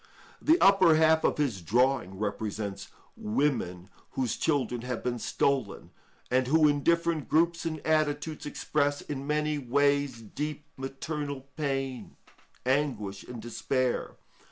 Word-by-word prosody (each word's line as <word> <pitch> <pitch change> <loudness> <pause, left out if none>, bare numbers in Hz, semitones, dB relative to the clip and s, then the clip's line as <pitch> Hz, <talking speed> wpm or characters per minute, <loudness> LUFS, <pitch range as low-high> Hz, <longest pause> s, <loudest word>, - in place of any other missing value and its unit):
The 325 +3 +4
upper 190 -5 +6
half 160 0 +4
of - - +2
his 130 -11 0
drawing 120 0 +1
represents 100 -1 -3 0.3
women 105 -7 -1 0.3
whose 125 -4 -1
children 130 -6 0
have 125 -1 -4
been 120 -1 -2
stolen, 130 -4 -1 0.4
and 130 0 +2
who 155 +2 +5
in 145 -1 +2
different 170 -1 +1
groups 170 +1 +2
and 155 -1 -3
attitudes, 155 -1 0
express 145 -1 0
in 140 -1 -6
many 150 0 0
ways 140 0 +1
deep 150 +6 -5
maternal 140 +1 -4
pain, 135 -4 -3 0.5
anguish, 125 -8 -1
and 125 -1 -8
despair. 125 +2 -1
140 Hz, 125 wpm, -29 LUFS, 120-150 Hz, 0.5 s, upper